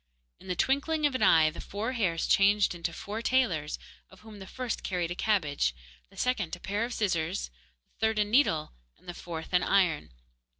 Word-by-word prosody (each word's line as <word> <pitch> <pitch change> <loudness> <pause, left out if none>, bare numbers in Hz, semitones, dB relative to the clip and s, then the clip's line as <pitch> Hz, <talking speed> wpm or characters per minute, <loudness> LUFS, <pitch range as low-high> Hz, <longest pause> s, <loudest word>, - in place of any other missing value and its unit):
In - - -15
the 180 - -1
twinkling 295 - +1
of 290 - +2
an 260 - -2
eye 160 -6 +5
the 160 - -8
four 215 +5 -4
hairs 185 -10 0
changed 200 0 +4
into 170 -1 -3
four 210 +6 -6
tailors, 200 - +1 0.3
of 190 -1 -18
whom 215 -2 -12
the 190 - -9
first 250 0 -4
carried 175 -2 -2
a - - -3
cabbage, 150 - 0 0.3
the - - -20
second 205 -10 -1
a - - -15
pair 205 +4 -2
of 240 - -3
scissors, 180 - -1 0.4
the 220 - +1
third 220 -1 -1
a 210 - +3
needle, 205 - +2 0.2
and - - -25
the 175 - -5
fourth 170 0 -7
an 180 - +4
iron. 180 -6 +2
195 Hz, 200 wpm, -29 LUFS, 170-220 Hz, 0.4 s, eye